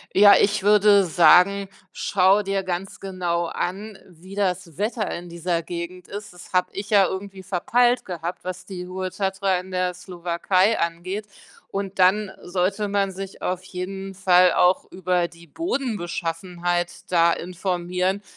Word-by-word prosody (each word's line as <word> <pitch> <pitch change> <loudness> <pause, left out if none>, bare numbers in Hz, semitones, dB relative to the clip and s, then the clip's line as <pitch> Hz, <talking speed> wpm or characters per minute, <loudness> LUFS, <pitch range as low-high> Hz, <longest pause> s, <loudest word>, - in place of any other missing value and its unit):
Ja, 205 +1 +8
ich 205 0 +2
würde 205 -1 +5
sagen, 180 +4 +5 0.2
schau 195 +2 +3
dir 195 0 -1
ganz 185 +1 -4
genau 175 -3 -2
an, 195 +5 -4
wie 180 +3 -13
das 185 -5 -2
Wetter 215 +1 -1
in 175 0 -8
dieser 170 0 -2
Gegend 175 +2 -7
ist. 205 -2 -7
Das 180 0 -14
habe 180 -1 +2
ich 200 +1 -6
ja 200 -2 +5
irgendwie 190 +1 -6
verpeilt 240 +7 +2
gehabt, 175 0 -6
was 185 0 -6
die 180 -2 -7
hohe 185 0 -3
Tatra 195 -1 0
in 185 +1 -10
der 180 0 0
Slowakei 180 +3 0
angeht. 185 +5 -3 0.4
Und 195 -1 -4
dann 190 +3 +4
sollte 190 +3 -1
man 200 -1 +1
sich 195 +1 -8
auf 180 0 -2
jeden 190 +1 -6
Fall 185 -1 +5
auch 180 +2 +3
über 180 -1 0
die 170 0 -17
Bodenbeschaffenheit 175 - -3
da 170 -1 +4
informieren 180 +2 -2
185 Hz, 145 wpm, -23 LUFS, 175-195 Hz, 0.4 s, Ja